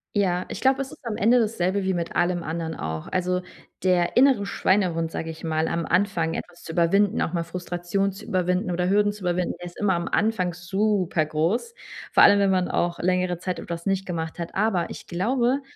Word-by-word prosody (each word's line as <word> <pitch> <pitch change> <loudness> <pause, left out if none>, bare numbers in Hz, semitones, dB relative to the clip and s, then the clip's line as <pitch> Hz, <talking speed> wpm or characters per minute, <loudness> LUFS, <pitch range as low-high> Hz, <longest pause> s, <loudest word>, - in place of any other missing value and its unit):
Ja, 185 -3 +1
ich - - -6
glaube, 265 0 +3
es 265 - -11
ist - - -14
am 215 - -3
Ende 235 +4 +4
das 225 -1 0
selbe 190 +3 0
wie 190 -1 0
mit 170 -1 -3
allem 175 0 +1
anderen 160 0 -3
auch. 80 0 -5
Also, 180 0 0 0.4
der 180 -2 +2
innere 255 -6 +5
Schweinehund, 180 -5 +1
sage 165 0 -4
ich 160 - -12
mal, 160 -1 0
am 170 -1 -2
Anfang 175 -3 +1
etwas 175 -1 -7
zu 160 - -8
überwinden, 190 +4 +3
auch 165 - -1
mal 170 - 0
Frustration 175 +3 -2
zu 195 +3 -11
überwinden 180 +1 0
oder 180 +1 0
Hürden 205 0 +3
zu 210 -1 -12
überwinden, 180 0 -1
ist 175 0 -9
immer 195 -3 +2
am 170 - -2
Anfang 200 -5 +1
supergroß, 180 - 0 0.4
vor - - +5
allem, 205 - +8
wenn 200 -1 +3
man 185 -1 +1
auch 175 0 -1
längere 180 -1 0
Zeit 180 0 -3
etwas 170 +2 -6
nicht 195 0 0
gemacht 165 -2 -4
hat. 170 -1 -5
Aber 195 -4 0
ich - - -9
glaube 245 +9 +1
180 Hz, 205 wpm, -24 LUFS, 170-200 Hz, 0.4 s, allem